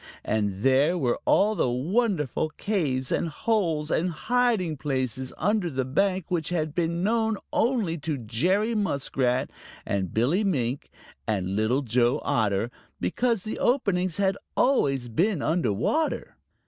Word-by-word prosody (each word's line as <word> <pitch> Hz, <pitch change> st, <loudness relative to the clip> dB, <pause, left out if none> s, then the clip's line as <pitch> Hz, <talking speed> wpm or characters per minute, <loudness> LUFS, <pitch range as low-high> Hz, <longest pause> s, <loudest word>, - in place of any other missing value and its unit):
And 105 Hz, -2 st, -1 dB
there 140 Hz, +6 st, +4 dB
were 125 Hz, -7 st, 0 dB
all 210 Hz, +2 st, +4 dB
the 160 Hz, -, +1 dB
wonderful 155 Hz, -, 0 dB
caves 140 Hz, -11 st, -1 dB
and 170 Hz, -, 0 dB
holes 165 Hz, -5 st, 0 dB
and 180 Hz, +3 st, +1 dB
hiding 215 Hz, -1 st, +1 dB
places 130 Hz, -3 st, -2 dB
under 205 Hz, 0 st, +1 dB
the 130 Hz, -3 st, -2 dB
bank 185 Hz, +6 st, +1 dB
which 165 Hz, -4 st, -1 dB
had 155 Hz, -4 st, -1 dB
been 170 Hz, +1 st, -1 dB
known 220 Hz, 0 st, +1 dB, 0.2 s
only 220 Hz, -9 st, +1 dB
to 150 Hz, 0 st, -2 dB
Jerry 180 Hz, -, 0 dB
Muskrat 135 Hz, -, 0 dB, 0.3 s
and 95 Hz, -3 st, -2 dB
Billy 140 Hz, -, +2 dB
Mink 135 Hz, -, -1 dB, 0.4 s
and 95 Hz, -3 st, -1 dB
Little 115 Hz, +6 st, +1 dB
Joe 120 Hz, 0 st, +2 dB
Otter, 110 Hz, +1 st, +1 dB, 0.3 s
because 235 Hz, -6 st, 0 dB
the 215 Hz, -, -5 dB
openings 185 Hz, -, +1 dB
had 195 Hz, -1 st, +1 dB, 0.2 s
always 135 Hz, -, +2 dB
been 165 Hz, -, 0 dB
under 160 Hz, -8 st, +1 dB
water. 305 Hz, -, -1 dB
160 Hz, 135 wpm, -26 LUFS, 130-200 Hz, 0.4 s, there